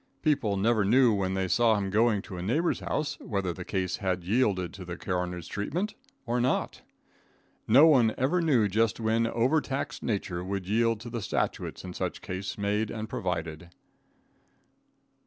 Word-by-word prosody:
People 125 - +1
never 110 +2 +2
knew 120 +3 +5
when 95 -2 -1
they 95 -1 0
saw 115 +3 +3
him 100 -1 -2
going 110 -1 +2
to 100 - -8
a 90 - -5
neighbor's 145 - 0
house, 150 - -2
whether 100 -5 -2
the 90 - -7
case 90 -1 -2
had 95 -3 -2
yielded 95 -4 +1
to 100 - -8
the 90 -1 -6
coroner's 90 -2 -3
treatment 170 - -3 0.3
or 120 0 0
not. 130 +2 -1 0.9
No 130 +8 +7
one 125 -8 +5
ever 150 +8 +1
knew 130 -10 +3
just 110 +3 +1
when 115 +1 +1
over 125 +7 +2
taxed 135 0 -4
nature 95 -5 -2
would 95 0 -4
yield 115 +1 +1
to 120 0 -8
the 115 -1 -3
statutes - - -2
in 90 -1 -7
such 90 -1 -4
case 95 0 -5
made 105 +1 0
and 110 0 -5
provided. 85 -8 -4
105 Hz, 170 wpm, -28 LUFS, 95-120 Hz, 0.9 s, No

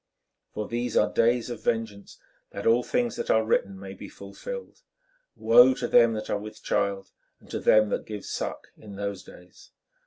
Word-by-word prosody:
For 105 - -3
these 120 0 -2
are - - +2
days 120 +1 +2
of 120 - -7
vengeance, 110 -3 -3 0.3
that 100 - -7
all 115 +2 +4
things 240 - -1
that - - -4
are 110 0 +3
written 100 -3 0
may 95 0 -8
be 95 - -10
fulfilled. 485 - -9 0.5
Woe 120 +3 +6
to 120 - -3
them 115 -1 +5
that 110 -1 -5
are 105 - -1
with 105 +1 -10
child 100 -1 -1 0.3
and - - -18
to - - -2
them 110 -1 +4
that - - -3
give 105 -2 -7
suck - - -5
in 105 -2 -12
those 100 -1 -4
days! 90 0 -16
110 Hz, 185 wpm, -26 LUFS, 100-120 Hz, 0.5 s, Woe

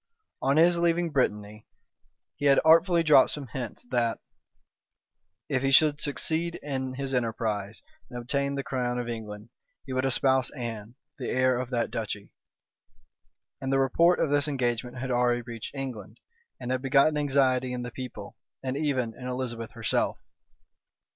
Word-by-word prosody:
On 135 +2 +2
his 170 +1 +5
leaving 170 0 +1
Brittany, 105 -6 -1 0.7
he 145 - -4
had 140 -1 +6
artfully 165 +2 +5
dropped 150 -4 +6
some 145 -2 -5
hints 120 -1 -6
that, 120 -2 +1 1.3
if 130 - 0
he 135 - +1
should 150 +2 +4
succeed 160 +3 -1
in 130 -2 -3
his 135 0 -4
enterprise, 110 -4 -2 0.3
and 120 - -7
obtain 140 +3 -1
the 140 - -3
crown 125 -2 -2
of 120 -1 -3
England, 110 -2 -7 0.4
he 130 - -6
would 130 0 0
espouse 130 -1 +2
Anne, 115 -2 -6 0.2
the 125 - -3
heir 130 0 +2
of 125 -1 -4
that 120 -3 -1
duchy; 105 -2 -5 1.3
and 135 0 -2
the 135 - +3
report 165 +7 +3
of 145 - +1
this 145 0 +2
engagement 125 -3 -1
had 130 0 -3
already 120 0 +2
reached 115 +2 -8
England, 130 -8 -6 0.4
and 125 0 -4
had 130 0 0
begotten 140 +3 +3
anxiety 135 -3 +2
in 125 -1 -4
the 120 - -6
people, 130 0 -8 0.3
and 130 0 -2
even 135 -6 -1
in 125 - -8
Elizabeth 125 -3 -4
herself. - - 0
130 Hz, 155 wpm, -27 LUFS, 120-140 Hz, 1.3 s, had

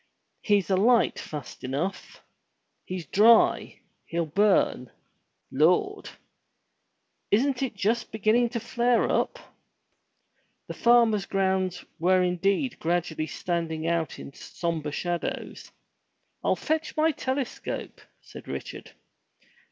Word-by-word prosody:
He's 205 -2 +1
alight 225 +5 +3
fast 145 -4 -8
enough. 140 +9 -4 0.6
He's 180 -2 -5
dry! 220 +9 +4 0.3
He'll 170 0 -1
burn! 185 - +2 0.6
Lord! 180 - +2 1.2
Isn't 255 +5 +2
it 265 -5 -2
just 220 +4 -1
beginning 220 +3 +2
to 235 0 -3
flare 240 +1 +1
up?" - - 0 1.3
The - - -7
farmer's 235 -4 +3
grounds 190 -2 0
were 185 +2 +3
indeed 195 +8 0
gradually 165 -2 -1
standing 165 -3 -3
out 165 -1 -1
in 140 - -10
sombre 160 -2 -4
shadows. 175 +3 -4 0.7
"I'll - - +2
fetch 315 0 -2
my 315 +1 +3
telescope," 265 -2 -4 0.2
said - - -12
Richard. - - -7
190 Hz, 100 wpm, -26 LUFS, 170-235 Hz, 1.3 s, dry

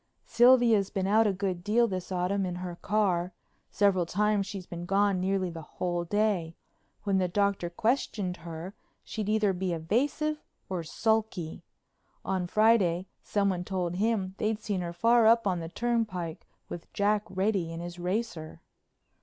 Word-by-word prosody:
Sylvia's 235 -4 +5
been 190 -1 -2
out 215 +3 +4
a - - +3
good 185 -2 -3
deal 235 +4 +3
this 185 -2 -5
autumn 185 +2 0
in 180 -1 -3
her 180 -1 -5
car; 185 -3 0 0.4
several 190 -4 +2
times 205 +1 +1
she's 195 -2 -6
been 175 0 -7
gone 200 0 +2
nearly 190 -1 0
the 165 -1 -7 0.2
whole 175 -1 -1
day. 195 -4 0 0.5
When 195 -2 +1
the 185 - +1
Doctor 200 -1 0
questioned 205 -2 -1
her 170 +3 -7 0.3
she'd 215 -2 -4
either 215 -2 +2
be 180 -1 -2
evasive 280 - 0 0.3
or 185 -2 -2
sulky. 210 -1 -1 0.6
On 185 -2 -1
Friday 195 -4 +3 0.2
someone 195 -3 0
told 180 -2 -2
him 205 -3 0
they'd 215 0 0
seen 205 -4 -2
her 170 -1 -4
far 230 +6 +4
up 230 0 +5
on 185 -3 +1
the 165 0 -6
turnpike 205 -7 -2 0.2
with 170 - -8
Jack 205 +1 +2
Reddy 190 -3 0
in 165 - -6
his 175 +1 -7
racer." 180 -3 -3
195 Hz, 155 wpm, -29 LUFS, 175-215 Hz, 0.6 s, Sylvia's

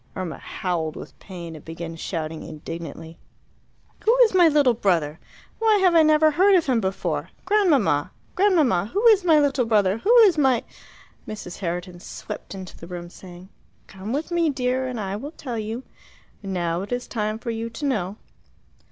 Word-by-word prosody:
Irma 185 -4 -5
howled 165 -4 -3
with - - -11
pain, 170 -4 -9
and 150 - -12
began 165 0 -7
shouting 160 -1 -4
indignantly, 165 +1 -8 0.8
"Who 460 +3 +4
is 440 - +2
my 355 -2 +6
little 290 -5 +4
brother? 170 -8 0 0.4
Why 445 -1 +4
have 375 -3 +4
I 330 - +7
never 310 0 +5
heard 380 +6 +4
of 350 - +3
him 250 -4 +1
before? 185 -5 -2 0.2
Grandmamma! 305 - +2 0.2
Grandmamma! 305 - +2
Who 420 +4 0
is 410 -4 +5
my 320 -4 +5
little 275 -4 +2
brother? 205 -2 +2
Who 470 - +4
is 350 -6 +3
my 260 -4 +3 0.3
" - - -27
Mrs. 210 -5 -7
Herriton 175 -1 -4
swept 190 - -8
into 190 -2 -9
the 170 - -11
room, 175 -1 -7
saying, 180 0 -13 0.4
"Come 195 +3 -8
with 295 +6 -3
me, 340 -2 +2
dear, 260 -1 -1
and 250 -3 -4
I 195 -1 -3
will 285 +8 -7
tell 245 -8 -5
you. 220 +4 -5 0.6
Now 175 -3 -2
it 200 - -8
is 245 0 -2
time 215 -2 -2
for 230 +1 -5
you 225 0 -4
to 230 +6 -6
know." 210 -7 -1
220 Hz, 180 wpm, -23 LUFS, -, 0.8 s, I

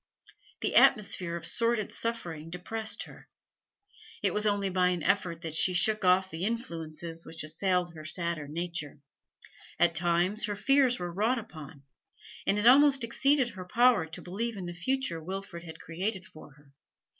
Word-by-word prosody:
The - - -1
atmosphere 190 -6 +3
of 170 - -6
sordid 230 -3 +1
suffering 170 -9 -3
depressed 220 +6 -4
her; - - -15 0.9
it - - +1
was 210 0 +1
only 205 -1 +1
by 180 0 +2
an 175 -3 -2
effort 180 -3 0
that 160 -2 -5
she 180 +3 +3
shook 215 +3 +4
off 185 +1 +3
the 165 +2 -5
influences 165 -7 -4
which 160 -1 -6
assailed 175 +2 0
her 155 -1 -10
sadder 170 -1 -2
nature; 165 -1 -5 0.8
at 170 -1 +3
times 175 +6 +1
her 205 -2 -3
fears 265 +2 +3
were 175 -1 -5
wrought 220 +7 +1
upon, 155 - -10 0.6
and 200 - +2
it 210 - 0
almost 275 +1 +6
exceeded 265 +2 +2
her 185 -3 -9
power 230 -3 +3
to 160 - -8
believe 215 +5 -4
in 185 - -6
the 175 - -6
future 180 -2 -2
Wilfrid 185 -1 -7
had 160 -1 -10
created 190 +3 -4
for 155 -4 -14
her. 145 -1 -23
180 Hz, 165 wpm, -29 LUFS, 165-220 Hz, 0.9 s, almost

